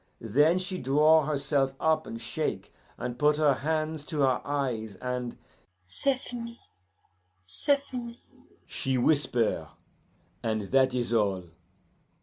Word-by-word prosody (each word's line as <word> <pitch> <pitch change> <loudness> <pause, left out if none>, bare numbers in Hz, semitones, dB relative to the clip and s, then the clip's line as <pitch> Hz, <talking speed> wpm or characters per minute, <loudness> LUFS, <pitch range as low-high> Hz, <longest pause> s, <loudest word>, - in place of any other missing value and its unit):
Then 145 - +3
she 185 0 -3
draw 150 +3 +4
herself 140 -2 +1
up, 160 0 +1
and 115 - -6
shake, 145 +7 -3 0.2
and 125 0 -5
put 150 0 +4
her 150 -2 +4
hands 155 +2 -2
to 150 -2 -2
her 130 -2 +3
eyes, 125 -7 -2
and 125 +1 -4 0.5
'C'est 260 - +1
fini! 235 -2 -8 0.9
c'est 185 - +3
fini!' 240 -3 -7 0.5
she 130 -1 -2
whisper, 120 - +1 0.7
and 110 -3 -2
that 130 -1 +4
is 120 -1 -1
all. 100 -5 +1
140 Hz, 125 wpm, -28 LUFS, 120-160 Hz, 0.9 s, draw